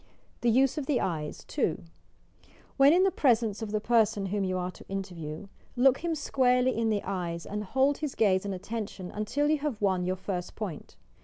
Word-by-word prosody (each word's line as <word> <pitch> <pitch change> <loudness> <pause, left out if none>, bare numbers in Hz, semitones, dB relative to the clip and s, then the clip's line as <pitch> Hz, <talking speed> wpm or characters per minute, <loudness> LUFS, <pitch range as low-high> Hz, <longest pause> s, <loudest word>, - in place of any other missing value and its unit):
THE 240 - +3
USE 265 +5 +3
OP 275 - -5
THE 285 -5 +2
ETES 155 -4 -3
2. 165 +3 -1 0.9
When 275 +1 +6
in 360 +3 +5
the 385 - +3
presence 230 - +2
of 220 - -4
the 215 - 0
person 220 -2 +2
whom 200 +1 -1
yon 185 -1 -1
are 180 0 -3
to - - -15
interview, 180 -4 -5 0.3
look 260 +1 +4
him 335 -1 -1
squarely 255 -3 +2
in 225 0 +1
the 210 -2 0
eyes, 175 -3 -3
and 210 +1 -4
hold 265 +7 +1
hi« 305 - -1
gaze 190 -4 +3
and 200 -1 -3
attention 200 -1 -6
until 230 +8 -1
you 305 0 +2
have 285 -7 -3
won 190 -3 +1
your 185 - 0
first 180 -1 -5
point. 195 -8 -6
210 Hz, 200 wpm, -29 LUFS, 185-260 Hz, 0.9 s, When